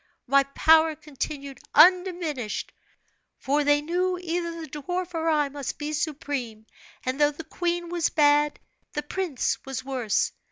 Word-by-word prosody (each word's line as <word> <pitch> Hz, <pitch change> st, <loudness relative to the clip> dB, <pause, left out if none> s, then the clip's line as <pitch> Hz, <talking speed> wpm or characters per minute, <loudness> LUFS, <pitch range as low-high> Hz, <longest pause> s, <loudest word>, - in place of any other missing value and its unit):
My 275 Hz, +2 st, +5 dB
power 320 Hz, 0 st, +5 dB
continued 280 Hz, -2 st, -6 dB, 0.2 s
undiminished; 340 Hz, -, +3 dB, 0.6 s
for 290 Hz, +2 st, +1 dB
they 290 Hz, 0 st, +3 dB
knew 360 Hz, +3 st, 0 dB
either 340 Hz, -1 st, -3 dB
the 320 Hz, -, -7 dB
dwarf 355 Hz, +5 st, -4 dB
or 325 Hz, 0 st, 0 dB
I 300 Hz, -2 st, +2 dB
must 280 Hz, -1 st, -5 dB
be 300 Hz, +1 st, -4 dB
supreme; 275 Hz, -7 st, -3 dB, 0.4 s
and 260 Hz, +3 st, -2 dB
though 295 Hz, -, +6 dB
the 295 Hz, +2 st, -8 dB
queen 345 Hz, +2 st, -2 dB
was 345 Hz, -1 st, +1 dB
bad, 295 Hz, -1 st, +3 dB, 0.3 s
the 295 Hz, -, -2 dB
prince 325 Hz, -3 st, -2 dB
was 265 Hz, -1 st, -5 dB
worse. 250 Hz, -6 st, 0 dB
300 Hz, 145 wpm, -26 LUFS, 280-340 Hz, 0.6 s, though